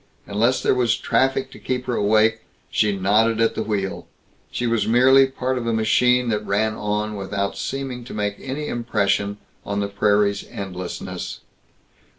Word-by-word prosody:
Unless 115 +5 +1
there - - +3
was 125 -3 +2
traffic 135 0 +1
to - - -12
keep 125 -1 -3
her 125 - -2
awake, 110 +1 +3 0.3
she 105 -2 +1
nodded 110 +4 +2
at 115 0 +3
the - - -3
wheel; 100 -3 -3 0.4
she 120 - -3
was 115 -2 +1
merely 130 +4 +6
a - - -4
part 130 -1 -2
of 115 - -5
a 115 - +1
machine 125 +3 +3
that 105 -1 -1
ran 110 +2 0
on 105 0 -2
without 100 0 -3
seeming 135 -3 -4
to - - -9
make 105 -1 -1
any 140 +3 -4
impression 100 -3 0 0.3
on 100 0 -3
the 100 - 0
prairie's 100 0 +1
endlessness. 90 -2 -6
110 Hz, 165 wpm, -22 LUFS, 100-125 Hz, 0.4 s, merely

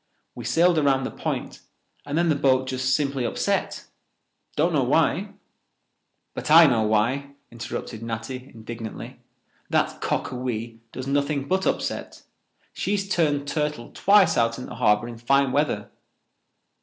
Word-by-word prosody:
We 120 - -8
sailed 165 +6 +3
around 135 -2 +2
the - - -3
point - - -4 0.5
and 145 +2 -2
then 170 0 +2
the 155 - +3
boat 130 -2 +2
just 130 0 +1
simply 140 -3 -1
upset—don't 120 - -3
know - - +3
why—" - - +1 1.0
"But - - -5
I 165 +2 +9
know 120 -6 +3
why," 120 +7 0 0.2
interrupted 115 -1 -6
Natty 115 +3 -5
indignantly. 115 0 -8 0.5
"That - - 0
Cockawee 120 -2 -3
does 130 - -6
nothing 140 0 0
but 190 +3 +1
upset. - - -3 0.5
She 200 - -2
has 200 -1 -1
turned 145 -6 +1
turtle 150 -5 -2
twice 200 -4 +4
out 115 -1 +2
in 125 - -6
the - - -9
harbour 110 -1 +3
in 120 -1 -9
fine 135 +3 +2
weather. 135 -7 0
130 Hz, 140 wpm, -24 LUFS, 120-150 Hz, 1.0 s, I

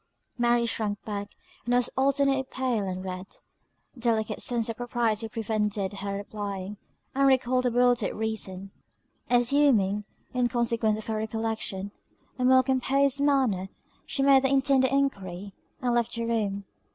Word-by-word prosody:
Mary 240 -1 +2
shrunk 210 -3 -2
back, 205 -1 -4 0.3
and 245 +1 +1
was 245 0 +2
alternately 275 0 +2
pale 255 -6 -2
and 185 0 -4
red. 185 0 -5 0.7
A - - -14
delicate 220 -2 0
sense 235 -2 +2
of 230 -1 -4
propriety 235 -2 -1
prevented 210 -3 -2
her 200 0 -4
replying; 200 -1 -5 0.4
and 275 +1 +3
recalled 255 -1 +2
her - - +4
bewildered 245 -2 +2
reason. 195 -3 -3 0.6
Assuming, 240 -5 +3 0.3
in 250 -1 +2
consequence 230 -2 0
of 215 - -8
her 220 -1 -2
recollection, 220 -2 -3 0.5
a - - 0
more 260 0 +6
composed 270 +1 +2
manner, 260 -10 +2 0.4
she 275 - -1
made 275 -1 +6
the 265 - +1
intended 270 -1 +3
enquiry, 200 -9 -2 0.3
and 245 -1 +1
left 240 0 0
the 230 0 -2
room. 205 -4 -1
230 Hz, 145 wpm, -27 LUFS, 205-255 Hz, 0.7 s, more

